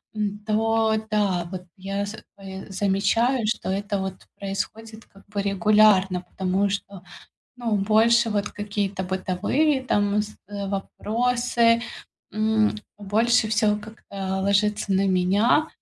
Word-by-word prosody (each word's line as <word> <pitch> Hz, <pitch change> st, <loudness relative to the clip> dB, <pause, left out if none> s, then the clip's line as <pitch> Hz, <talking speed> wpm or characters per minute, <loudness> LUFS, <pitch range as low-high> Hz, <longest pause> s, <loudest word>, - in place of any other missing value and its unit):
м, 205 Hz, -1 st, -2 dB
то 220 Hz, 0 st, +2 dB
да, 195 Hz, -5 st, +1 dB
вот 180 Hz, -1 st, -6 dB
я 195 Hz, +2 st, -3 dB
за 210 Hz, +2 st, -7 dB, 0.2 s
собой, 190 Hz, -1 st, -8 dB
замечаю, 205 Hz, +5 st, +1 dB
что 220 Hz, -, -2 dB
это 200 Hz, +1 st, -1 dB
вот 190 Hz, -1 st, -3 dB, 0.3 s
происходит 220 Hz, +3 st, -5 dB
как 195 Hz, -, -21 dB
бы 200 Hz, -1 st, -3 dB
регулярно, 195 Hz, -1 st, +4 dB
потому 190 Hz, +2 st, -1 dB
что, 200 Hz, -1 st, -5 dB, 0.5 s
ну, 235 Hz, -3 st, -1 dB
больше 225 Hz, +3 st, +4 dB
вот 210 Hz, 0 st, -1 dB
какие-то 200 Hz, -2 st, -3 dB
бытовые 190 Hz, +11 st, 0 dB
там 205 Hz, -3 st, +1 dB
с 210 Hz, 0 st, -8 dB
э, 200 Hz, -1 st, -4 dB
вопросы, 235 Hz, +3 st, +1 dB, 0.5 s
м, 215 Hz, 0 st, +2 dB, 0.2 s
больше 220 Hz, +3 st, +2 dB
всего 210 Hz, -1 st, +2 dB
как-то 195 Hz, -3 st, -5 dB
ложится 205 Hz, +1 st, +1 dB
на 195 Hz, +1 st, +2 dB
меня. 200 Hz, +11 st, +3 dB
205 Hz, 125 wpm, -24 LUFS, 195-220 Hz, 0.5 s, регулярно